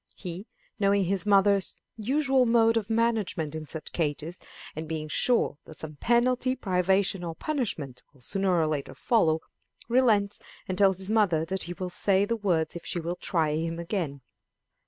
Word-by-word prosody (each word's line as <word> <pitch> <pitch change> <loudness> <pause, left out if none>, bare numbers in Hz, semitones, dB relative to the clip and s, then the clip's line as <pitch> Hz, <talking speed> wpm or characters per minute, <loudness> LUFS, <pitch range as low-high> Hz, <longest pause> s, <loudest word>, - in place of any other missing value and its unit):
He, 180 +2 -7 0.3
knowing 200 -1 +3
his 195 +2 0
mother's 200 -1 +3 0.2
usual 265 +3 +2
mode 230 -1 +4
of 220 -2 -1
management 220 -9 0
in 155 -1 -6
such 160 +2 -6
cases, 160 +1 -3 0.4
and 155 +1 -5
being 155 -1 -3
sure 225 - +2
that 155 - -12
some 155 -2 -6
penalty, 250 - +2
privation, 190 -3 +1
or 165 -1 -5
punishment 160 - -2
will 135 -3 -24
sooner 190 +4 0
or 160 - +2
later 150 -3 -3
follow, 160 -10 +2 0.5
relents, 225 -5 +2 0.3
and 185 - -2
tells 195 -1 +3
his 190 +2 -1
mother 185 -8 +2
that 190 +3 -2
he 175 - -5
will 180 0 -5
say 195 +2 +3
the 230 - -1
words 175 -8 0
if 170 - -7
she 175 - -3
will 170 +1 -3
try 160 -5 0
him 165 +2 -2
again. 170 -5 -3
190 Hz, 170 wpm, -27 LUFS, 160-220 Hz, 0.5 s, mode